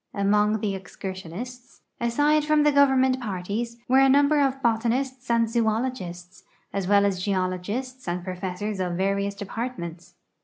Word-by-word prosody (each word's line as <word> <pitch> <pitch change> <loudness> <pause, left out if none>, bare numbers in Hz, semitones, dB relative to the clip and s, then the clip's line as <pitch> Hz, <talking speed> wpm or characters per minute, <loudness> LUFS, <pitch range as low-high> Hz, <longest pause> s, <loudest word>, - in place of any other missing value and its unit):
Among 210 +1 +2
the 205 -2 -1
excursionists, 190 +6 -8 0.2
aside 290 +6 +2
from 305 0 +3
the 295 - +4
government 265 -2 +4
parties, 215 +3 -3
were 260 +2 +5
a 270 0 +6
number 285 +2 +4
of 270 -1 +1
botanists 245 +3 0
and 230 -1 +3
zoologists, 220 -6 -2 0.3
as 195 -2 -2
well 200 0 +5
as 190 -2 0
geologists 200 +7 -2
and 175 0 -2
professors 185 +3 -4
of 180 -1 -1
various 200 +2 0
departments. 185 -5 -6
215 Hz, 140 wpm, -25 LUFS, 190-255 Hz, 0.3 s, a